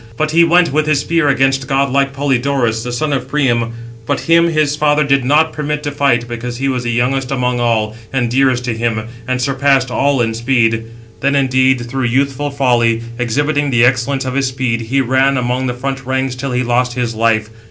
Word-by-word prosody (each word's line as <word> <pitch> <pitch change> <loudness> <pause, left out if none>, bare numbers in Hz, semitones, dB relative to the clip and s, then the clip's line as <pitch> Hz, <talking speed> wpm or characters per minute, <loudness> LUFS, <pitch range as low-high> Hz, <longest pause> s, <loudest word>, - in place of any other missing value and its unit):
But 155 +2 0
he 170 +2 +5
went 170 -2 +3
with 155 0 +1
his 150 -2 +2
spear 165 -1 0
against 135 -1 +1
godlike 140 0 +1
Polydorus, 135 -4 0
666 - - -7
the 125 - -4
son 145 +4 -1
of 130 -2 -2
Priam; 120 -5 0 0.3
but - - -1
him 170 0 +3
his 155 -3 +1
father 150 0 +2
did 140 -2 +1
not 155 +4 +2
permit 150 0 -3
to 145 - -3
fight, 135 -5 +1
because 120 +1 -5
he 135 +2 -2
was 125 -2 -2
the 120 - -1
youngest 125 +2 0
among 125 -2 -1
all, 110 -2 0 0.2
and 130 -3 0
dearest 125 0 +1
to 120 -2 -2
him, 115 -1 -1 0.2
and 130 0 -1
surpassed 135 -1 +1
all 140 +1 +1
in 115 -2 0
speed. 115 -1 +1 0.3
Then, 140 +1 +1
indeed, 130 -1 +2
through 130 +1 -2
youthful 135 +3 0
folly, 120 -4 +1 0.2
exhibiting 145 +5 0
the 120 -2 +3
excellence 130 +2 0
of 130 - -3
his 135 0 0
speed, 130 -3 -2
he 130 +5 0
ran 130 +2 +2
among 125 +1 -1
the 125 - -3
front 135 +2 -4
ranks 130 0 -2
till 130 +1 -5
he 125 0 0
lost 125 0 0
his 120 -2 -2
life. 110 -1 0
130 Hz, 205 wpm, -15 LUFS, 120-140 Hz, 0.3 s, he